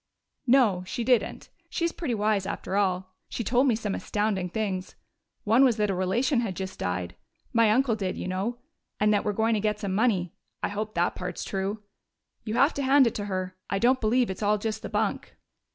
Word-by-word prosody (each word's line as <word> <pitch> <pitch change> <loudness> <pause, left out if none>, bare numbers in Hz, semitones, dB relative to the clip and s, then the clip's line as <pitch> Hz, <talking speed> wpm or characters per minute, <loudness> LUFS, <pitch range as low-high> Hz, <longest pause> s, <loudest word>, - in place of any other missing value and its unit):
"No, 235 -8 +4
she 235 - -3
didn't. 245 0 +1 0.2
She's 335 -1 -1
pretty 280 -10 -3
wise, 210 -2 +1
after 190 - -4
all. 185 -2 0 0.2
She 235 - -3
told 250 +5 +3
me 240 - +3
some 215 -3 -3
astounding 205 -4 -1
things. 190 -2 -3 0.5
One 225 +5 +5
was 245 -4 +4
that 210 -1 +1
a - - 0
relation 230 +9 +1
had 215 -6 -2
just 190 0 -6
died 90 0 -3 0.4
my 230 -2 +5
uncle 240 +1 +3
did, 195 -4 -3
you - - -4
know 195 +6 -2 0.4
and 210 0 +4
that 205 - +2
we're 210 - 0
going 220 +2 +1
to 215 - +1
get 210 0 0
some 200 -3 -3
money.... 195 -5 +1 0.3
I - - +1
hope 215 +1 -4
that 175 +1 +1
part's 180 -1 -5
true.... 200 +2 -3 0.6
You 215 0 -3
have 275 +5 +4
to 280 - -3
hand 270 0 +5
it 230 - +1
to 205 - -4
her. 185 -2 -3
I 195 - 0
don't 250 +5 +3
believe 235 0 +2
it's 190 - -7
all 210 0 +3
just 220 +1 -3
the - - -6
bunk." - - -2
210 Hz, 210 wpm, -27 LUFS, 190-235 Hz, 0.6 s, One